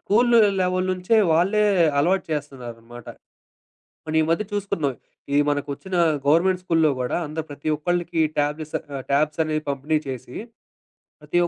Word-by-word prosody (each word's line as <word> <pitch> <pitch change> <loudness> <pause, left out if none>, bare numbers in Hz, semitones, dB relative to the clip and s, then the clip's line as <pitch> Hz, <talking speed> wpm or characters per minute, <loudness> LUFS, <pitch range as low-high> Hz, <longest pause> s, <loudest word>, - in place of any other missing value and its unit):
School 235 +3 +3 0.2
level 185 0 0
నుంచే 185 +5 +1 0.2
వాళ్ళే 195 +6 +2 0.4
అలవాటు 185 +6 +2
చేస్తున్నారనమాట. 120 -5 -7 1.0
మన 155 - -5
ఈ - - +2
మధ్య 170 +6 +1
చూసుకున్నాం. 195 -9 -1 0.4
ఈ - - +4
మనకు 145 0 -2
ఒచ్చిన 190 +5 -7 0.3
గవర్నమెంట్ 180 +5 +3
స్కూలులో 165 -4 +2
గూడా 125 +4 -1
అంద 155 +2 -6
ప్రతి 145 +1 -8
ఒక్కళ్ళకి 175 +2 -2 0.2
ట్యాబ్లస్ 150 +1 -2
ఆహ్, 140 -2 -8
ట్యాబ్స్‌సనేవి 155 +1 0
పంపిణీ 145 +3 0
చేసి, 125 -1 -7 0.9
ప్రతి 175 - -2
ఒ - - -1
155 Hz, 135 wpm, -23 LUFS, 145-180 Hz, 1.0 s, ఈ